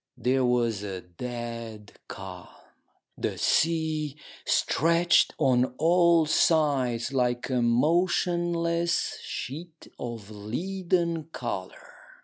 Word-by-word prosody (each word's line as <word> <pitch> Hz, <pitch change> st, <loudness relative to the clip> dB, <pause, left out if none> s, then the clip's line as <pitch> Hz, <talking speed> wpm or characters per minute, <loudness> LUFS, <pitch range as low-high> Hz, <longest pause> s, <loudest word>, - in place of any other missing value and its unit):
There 130 Hz, +1 st, +1 dB
was 120 Hz, -4 st, +1 dB
a 95 Hz, -3 st, -5 dB
dead 115 Hz, +2 st, -7 dB, 0.2 s
calm. 95 Hz, -2 st, -8 dB, 0.7 s
The -, -, -2 dB
sea 155 Hz, -3 st, +1 dB, 0.3 s
stretched 170 Hz, +2 st, +3 dB
on 130 Hz, -3 st, +2 dB
all 170 Hz, 0 st, +4 dB
sides 140 Hz, -6 st, +2 dB
like 125 Hz, 0 st, 0 dB
a 125 Hz, -1 st, +1 dB
motionless 170 Hz, +5 st, +1 dB
sheet 160 Hz, +5 st, -7 dB
of 115 Hz, -4 st, -6 dB
leaden 170 Hz, -, -2 dB
colour. 120 Hz, -, -6 dB
135 Hz, 90 wpm, -27 LUFS, 120-170 Hz, 0.7 s, all